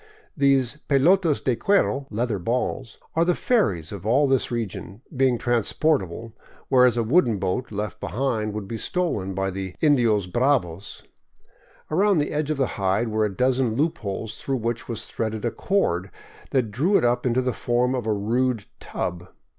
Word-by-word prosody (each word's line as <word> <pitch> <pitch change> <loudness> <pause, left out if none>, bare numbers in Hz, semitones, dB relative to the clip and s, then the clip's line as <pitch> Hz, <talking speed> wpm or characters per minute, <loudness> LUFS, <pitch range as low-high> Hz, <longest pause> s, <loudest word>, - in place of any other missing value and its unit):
These 140 -1 +2
" - - -44
pelotas 160 +3 +3
de 125 - +1
cuero 140 - +1
" - - -31
("leather 110 -1 -1
balls 120 +4 -2
") - - -41
are 165 - +4
the 175 0 +2
ferries 95 - 0
of 100 -3 -7
all 130 +7 +3
this 135 -2 +2
region, 115 -1 -5
being 130 -2 +3
transportable, 115 - 0 0.4
whereas 125 -3 +5
a 115 - +2
wooden 120 - +3
boat, 95 +7 -2
left 105 -1 -4
behind, 115 -3 -2
would 105 -2 -5
be 115 +1 -5
stolen 105 - -2
by 95 0 -1
the 95 -1 -5
" - - -46
indios 120 - +3
bravos." 100 - -1 0.9
Around 195 +4 +3
the 145 - 0
edge 150 0 -1
of 155 - -1
the 130 -6 -2
hide 100 +5 +1
were 110 0 +1
a 100 -2 -4
dozen 125 -3 +1
loop 155 +6 0
holes 105 +2 -5
through 135 -1 -1
which 115 0 -3
was 115 -1 -3
threaded 110 0 -3
a 120 - 0
cord 95 - 0 0.4
that 125 -5 0
drew 160 - +2
it - - +1
up 120 +1 +1
into 125 +1 +1
the 125 -1 0
form 120 +1 0
of 125 -4 -3
a - - +2
rude 115 +2 0
tub. 90 0 -4
120 Hz, 185 wpm, -24 LUFS, 105-135 Hz, 0.9 s, whereas